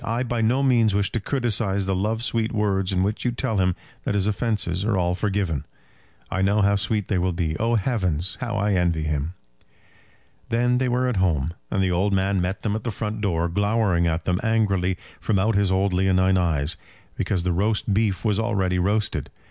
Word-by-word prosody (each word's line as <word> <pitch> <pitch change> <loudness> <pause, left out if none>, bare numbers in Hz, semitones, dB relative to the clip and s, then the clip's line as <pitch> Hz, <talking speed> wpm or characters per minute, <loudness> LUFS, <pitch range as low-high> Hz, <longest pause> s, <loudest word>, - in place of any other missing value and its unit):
I 115 +2 -1
by 120 -2 -1
no 125 +5 +2
means 115 -6 +3
wish 100 -1 +1
to 115 - -1
criticise 105 -5 -1
the 95 - 0
love 110 +4 -1
sweet 115 -2 0
words 100 -3 0
in 95 -1 +1
which 105 +3 -1
you 125 - +2
tell 120 -2 -2
him 90 -1 +2 0.3
that - - -1
his 100 -2 +1
offences 100 -3 -1
are 105 -2 +1
all 90 -1 +1
forgiven. 95 -6 -1 0.7
I 95 - 0
know 100 +2 +3
how 100 0 +3
sweet 105 +1 -1
they 95 - 0
will 90 0 0
be. 85 -2 -1
Oh, 115 +1 +2
heavens! 95 - 0
how 115 -5 -2
I 100 0 +1
envy 85 -4 +1
him!" 75 +3 -2 1.1
Then 125 +2 +2
they 130 -1 +1
were 125 +1 +1
at 125 -5 -1
home; 85 -4 +1 0.2
and 95 - 0
the 95 - +1
old 95 +3 +1
man 95 0 +1
met 90 +2 -3
them 105 -2 0
at 110 - -4
the 120 - -2
front 110 0 -4
door, 85 -5 0
glowering 100 -1 +1
at 80 0 -1
them 90 0 +1
angrily 100 -5 +1 0.2
from 105 - 0
out 105 +4 +2
his 100 -2 +2
old 95 0 +1
leonine 95 0 +3
eyes, 85 -4 +1 0.4
because 90 -3 -1
the 90 -1 0
roast 105 +3 0
beef 105 -1 0
was 105 -1 +2
already 95 -5 0
roasted. 105 +4 0
100 Hz, 205 wpm, -24 LUFS, 90-110 Hz, 1.1 s, means